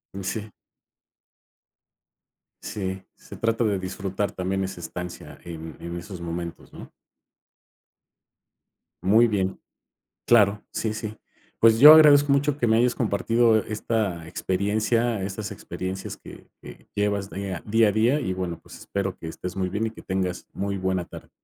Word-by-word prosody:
Mm, 95 - -5
sí. 105 +2 -4 2.1
Sí, 95 -2 -4
se - - -12
trata 115 +1 +1
de 105 -3 +1
disfrutar 95 +2 -3
también 95 0 -2
esa 95 -1 -5
estancia, 90 +1 -7
en 80 -1 -8
en 85 0 -6
esos 90 0 -8
momentos, 85 0 -6
¿no? - - -11 2.1
Muy 110 +6 +5
bien. 95 -3 -1 0.7
Claro. 105 -3 +4
Sí, 110 - -2
sí. 110 0 -5 0.4
Pues, 115 0 +5
yo 150 +5 +12
agradezco 145 -2 +7
mucho 140 0 +2
que 125 - 0
me 110 0 +4
hayas 125 +1 +3
compartido 115 +1 +2
esta 105 -6 -2
experiencia, 105 +5 0
estas 100 +2 -4
experiencias 95 0 -6
que - - -13 0.2
que - - -13
llevas 100 -1 0
dea 95 -3 -5
día 110 +1 +4
a - - +1
día. 120 +8 +2
Y, 105 -9 -2
bueno, 90 -3 -4
pues, - - -13
espero 100 -2 -3
que 80 - -7
estés 90 +3 -7
muy 95 -1 -1
bien 105 +4 -1
y - - -3
que 110 - -13
tengas 95 -2 -2
muy 100 0 -3
buena 95 -1 -1
tarde. - - -12
100 Hz, 150 wpm, -25 LUFS, 95-110 Hz, 2.1 s, yo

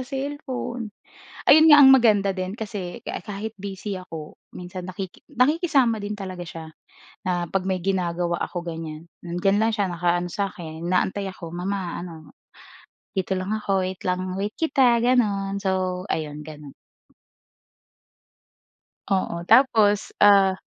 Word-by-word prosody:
cellphone. 260 -3 -4 0.6
Ayun 315 +2 +7
nga 295 -2 +9
ang 265 - +9
maganda 215 -6 +5
din 185 +1 -4
kasi 200 -5 -6
ka-kahit 205 +3 -5
busy 195 0 -5
ako 160 -4 -9 0.2
minsan 180 0 -7
nakiki 185 0 -7
nakikisama 275 - +2
din 205 +1 -4
talaga 185 -3 -7
siya 165 -1 -8 0.6
na 175 -2 -1
'pag 190 -1 -1
may 185 -2 -1
ginagawa 175 -2 -1
ako 175 - -5
ganyan, 165 -1 -7 0.2
hmm, 175 +1 -4
nandiyan 195 +1 +3
lang 220 +2 +2
siya 205 -2 +1
nakaano 175 0 0
sa 200 +3 -1
'kin 160 -1 -8
inaantay 185 +3 0
ako, 170 -3 -9
mama 180 +1 -3
ano, 165 -3 -9 0.9
dito 190 0 -1
lang 195 +4 -2
ako 195 -3 0
wait 185 0 -7
lang 180 0 0 0.2
wait 200 +2 -2
kita 260 -7 +3
ganon. 205 -5 +1
So, 185 -1 -1
ayun 150 -1 -4
ganon. 150 -2 -11 2.4
Oo, 185 -3 -1
tapos, 220 -4 +4
ah 195 -2 +5
190 Hz, 135 wpm, -24 LUFS, 175-215 Hz, 2.4 s, nga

